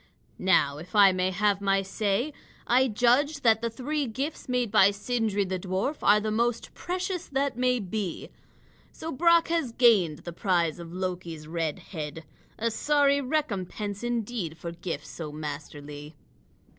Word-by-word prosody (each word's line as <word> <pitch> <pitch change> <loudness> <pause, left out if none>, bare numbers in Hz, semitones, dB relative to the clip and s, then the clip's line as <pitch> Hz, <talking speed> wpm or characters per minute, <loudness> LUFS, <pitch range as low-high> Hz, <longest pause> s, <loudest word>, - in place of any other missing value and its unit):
Now, 150 -6 +3
if 175 +6 -10
I 200 -2 +8
may 185 0 0
have 200 +1 +1
my 195 0 +2
say, 210 +8 -1 0.3
I 255 +2 +4
judge 255 +6 +2
that 225 -3 +4
the 235 - -1
three 275 +5 -2
gifts 265 +6 -4
made 250 -3 0
by 200 -2 +6
Sindri 205 0 -1
the 185 0 -3
dwarf 190 - -2
are 205 +1 +5
the 215 0 -2
most 235 +1 -1
precious 360 0 -3
that 275 0 -1
may 250 0 +2
be. 195 -3 -4 0.6
So 320 - -6
Brock 335 +4 +4
has 330 -7 0
gained 210 - +3
the 175 - -5
prize 170 -3 0
of 170 -1 -8
Loki's 175 -4 -5
red 160 -2 -2 0.2
head, 155 -1 -5 0.3
a 230 +1 0
sorry 285 +3 +3
recompense 210 - -2
indeed 230 -8 -3
for 170 - -6
gifts 170 0 -6
so 155 -3 -6
masterly." 150 0 -7
205 Hz, 155 wpm, -27 LUFS, 175-250 Hz, 0.6 s, I